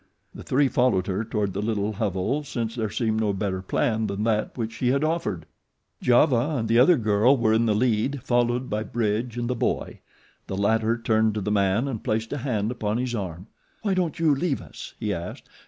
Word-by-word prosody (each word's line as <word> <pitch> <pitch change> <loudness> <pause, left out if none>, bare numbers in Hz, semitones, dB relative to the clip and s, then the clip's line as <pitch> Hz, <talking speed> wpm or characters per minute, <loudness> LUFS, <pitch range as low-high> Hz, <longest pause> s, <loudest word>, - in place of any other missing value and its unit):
The - - -9
three 140 +2 +2
followed 125 -8 +2
her 100 +2 -1
toward 105 -3 -2
the 100 - -2
little 105 -1 -1
hovel 105 +7 -1
since 115 -5 -3
there 110 -3 -2
seemed 110 +1 0
no 105 -2 +1
better 95 -1 -2
plan 110 +3 0
than 100 +1 -3
that 110 +1 0
which 115 -2 -2
she 125 - -2
had 140 +3 +2
offered. 155 - -1 0.6
Giova 125 +3 +3
and 115 -2 -1
the 115 +2 +4
other 155 +7 +6
girl 110 +4 +3
were 110 -2 +2
in 115 +1 +3
the 105 - +2
lead, 120 +3 0
followed 120 0 +1
by 105 +1 -2
Bridge 115 +1 -2
and 120 0 -2
the 125 - 0
boy. 120 - -2 0.5
The 95 - -4
latter 110 +3 +2
turned 110 -2 +1
to 105 - -2
the 105 +2 -2
man 100 +5 +2
and 120 -6 -4
placed 110 +3 -1
a 145 - -3
hand 110 -4 -1
upon 110 -3 -2
his 125 0 -2
arm. 95 -5 -4 0.4
"Why 200 -3 +1
don't 180 -3 -1
you 160 -3 +3
leave 140 0 0
us," - - -10
he 105 -2 -1
asked. 85 +1 -7
110 Hz, 210 wpm, -25 LUFS, 105-125 Hz, 0.6 s, other